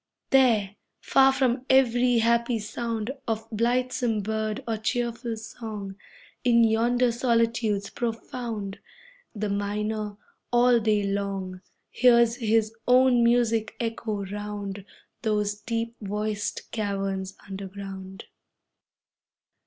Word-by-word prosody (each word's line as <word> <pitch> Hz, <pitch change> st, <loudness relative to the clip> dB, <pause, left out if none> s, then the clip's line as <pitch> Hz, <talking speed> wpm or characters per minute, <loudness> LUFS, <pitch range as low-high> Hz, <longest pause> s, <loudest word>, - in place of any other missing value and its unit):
There, 225 Hz, -7 st, +4 dB, 0.2 s
far 270 Hz, 0 st, +5 dB
from 260 Hz, -2 st, +1 dB
every 245 Hz, -2 st, +4 dB
happy 235 Hz, +1 st, +2 dB
sound 225 Hz, +2 st, -3 dB, 0.2 s
Of 225 Hz, 0 st, -2 dB
blithesome 240 Hz, 0 st, 0 dB
bird 215 Hz, 0 st, -2 dB
or 225 Hz, -1 st, -1 dB
cheerful 235 Hz, 0 st, -2 dB
song, 215 Hz, -3 st, -7 dB, 0.5 s
In 235 Hz, -2 st, +5 dB
yonder 235 Hz, +2 st, +3 dB
solitudes 230 Hz, -4 st, +1 dB
profound, 230 Hz, -3 st, -4 dB, 0.6 s
The 210 Hz, 0 st, -2 dB
miner, 210 Hz, +1 st, -2 dB, 0.3 s
all 240 Hz, 0 st, +5 dB
day 215 Hz, -2 st, +2 dB
long, 195 Hz, -2 st, -3 dB, 0.3 s
Hears 235 Hz, -2 st, +4 dB
his 225 Hz, -2 st, +1 dB
own 250 Hz, -1 st, +5 dB
music 235 Hz, -2 st, +2 dB
echo 225 Hz, -3 st, -3 dB
round 205 Hz, -1 st, -5 dB, 0.4 s
Those 210 Hz, -2 st, 0 dB
deep 230 Hz, 0 st, -3 dB
voiced 210 Hz, 0 st, -3 dB
caverns 195 Hz, -3 st, -2 dB
underground. 195 Hz, 0 st, -7 dB
220 Hz, 100 wpm, -26 LUFS, 205-235 Hz, 0.6 s, far